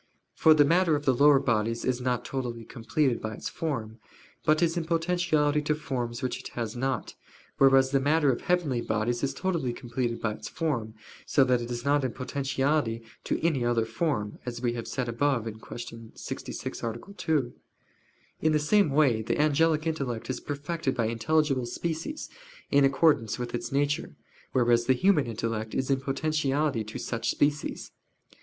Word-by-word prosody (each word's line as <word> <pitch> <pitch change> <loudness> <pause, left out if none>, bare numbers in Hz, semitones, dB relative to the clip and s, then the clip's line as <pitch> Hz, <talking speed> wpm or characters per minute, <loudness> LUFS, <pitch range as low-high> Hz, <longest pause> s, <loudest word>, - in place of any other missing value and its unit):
For 160 -1 +5
the 145 -1 +6
matter 170 +1 +3
of 145 0 -3
the 130 - +4
lower 145 +3 +6
bodies 115 -2 0
is 130 -1 0
not 125 -1 -1
totally 120 -4 -4
completed 120 +3 -1
by 110 0 -4
its - - -5
form, 115 -8 -4 0.4
but 155 +2 +3
is 165 0 +2
in 170 -2 -1
potentiality 165 -3 +1
to 150 +1 0
forms 125 -4 -4
which 130 - -2
it - - -8
has 115 -1 -3
not: 130 +2 -2 0.5
whereas 135 -1 +5
the 135 - +3
matter 145 +1 +3
of 120 - -3
heavenly 160 -9 +1
bodies 115 +2 -1
is 140 - 0
totally 170 -8 -1
completed 120 -1 -3
by 110 - -1
its 110 - -8
form, 120 -10 -2 0.3
so 135 - +4
that 125 -2 +2
it 120 - -5
is 120 +1 -4
not 145 0 +3
in 130 - -1
potentiality 135 -2 -1 0.2
to - - 0
any 145 -7 +2
other 120 -1 +1
form, 115 -3 -2
as 120 -1 -5
we 120 -1 0
have 115 -1 -5
said 130 -2 -2
above 120 0 0
(Q. 115 +1 -8
66, - - -6
A. 115 0 -3 0.2
2). 160 -9 0 0.9
In 155 0 +3
the - - +4
same 160 +4 +3
way 135 -6 +3
the 110 - -1
angelic 155 +1 +3
intellect 135 -7 -2
is - - -4
perfected 145 0 -3
by 115 - 0
intelligible 130 +3 +1
species, 170 - -4 0.4
in 140 - +5
accordance 135 -5 +3
with 120 -1 -5
its 120 - -3
nature; 145 +1 0 0.4
whereas 120 -2 +3
the 130 - +6
human 150 0 +3
intellect 110 -1 -3
is 130 +1 0
in 135 -1 +1
potentiality 145 -2 0
to 110 - -7
such 115 -1 -3
species. 145 +3 -1
135 Hz, 175 wpm, -28 LUFS, 120-150 Hz, 0.9 s, the